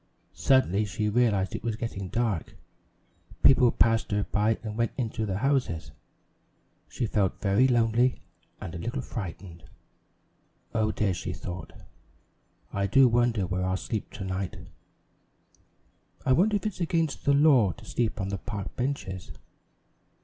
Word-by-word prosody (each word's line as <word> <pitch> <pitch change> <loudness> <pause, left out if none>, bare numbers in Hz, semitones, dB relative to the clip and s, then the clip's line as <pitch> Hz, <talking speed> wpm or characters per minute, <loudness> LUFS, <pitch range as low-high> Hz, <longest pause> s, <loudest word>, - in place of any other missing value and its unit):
Suddenly 110 -6 +3
she 105 +1 -2
realized 105 -4 +2
it - - -5
was 115 -2 -1
getting 110 -4 -5
dark; 110 -3 -2 0.9
people 125 -3 +6
passed 115 -1 +2 0.2
by 105 +2 +2
her - - -19
and 105 -2 -5
went 115 0 0
into 115 -3 -2
the 95 -1 -1
houses. 105 - 0 1.0
She 120 - -3
felt 100 -3 0
very 100 +6 +3
lonely 120 0 +2 0.4
and 80 - -7
a 85 - -5
little 120 +8 -3
frightened. 90 -5 -7 1.1
"Oh, 110 -2 +1
dear," 105 -3 0
she 90 0 -4
thought, 90 -1 -7 1.0
"I 100 0 0
do 130 +6 +6
wonder 120 -4 +2
where 90 +1 -2
I'll 95 0 0
sleep 110 +2 -4
to - - -6
night? 95 0 -3 1.7
I - - +2
wonder 205 +9 +3
if 205 - -2
it's 210 -4 -3
against 165 -3 0
the 140 - +4
law 140 -9 +5
to - - -15
sleep 120 -3 -1
on 95 0 -2
the 100 -1 -3
park 100 -1 -6
benches?" 95 -9 -3
110 Hz, 145 wpm, -27 LUFS, 95-125 Hz, 1.7 s, people